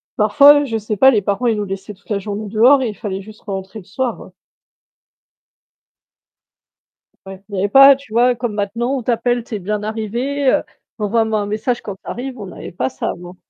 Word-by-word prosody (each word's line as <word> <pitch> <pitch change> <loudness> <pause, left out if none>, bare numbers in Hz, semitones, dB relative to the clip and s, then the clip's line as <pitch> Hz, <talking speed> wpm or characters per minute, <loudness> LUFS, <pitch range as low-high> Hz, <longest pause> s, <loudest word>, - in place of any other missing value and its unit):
parfois, 280 +8 +6
je 230 -5 -2
sais 215 0 -3
pas, 265 +6 +6
les 215 -5 +2
parents, 200 +5 -1
ils 225 -2 +1
nous 210 - -2
laissaient 195 +1 -6
toute 200 +1 -26
la 205 -2 0
journée 205 +1 -5
dehors 240 +7 +4
et 255 - 0
il 210 - -7
fallait 195 -2 -5
juste 215 +2 -14
rentrer 195 +1 -6
le 190 - -15
soir, 245 +5 -3
hein. - - -13 2.9
Ouais, 190 0 -10
il 205 - -6
y - - -2
avait 200 - +1
pas, 275 +4 +8
tu 270 -5 -14
vois, 245 +2 +4
comme 240 -2 -4
maintenant, 230 +6 -2
on 255 - -5
t'appelle: 240 +1 0
«Tu 225 - -7
es - - -4
bien 210 +2 -3
arrivée?» 235 +6 -3
Heu, - - +2 0.4
«Envoie-moi 220 +1 0
un - - -3
message 220 +4 -2
quand 200 - -7
tu - - -30
arrives», 255 +1 -6
on 205 - -6
n'avait - - -9
pas 130 -6 -2
ça, 130 - -4
avant. 175 +1 -8
215 Hz, 215 wpm, -18 LUFS, 200-245 Hz, 2.9 s, pas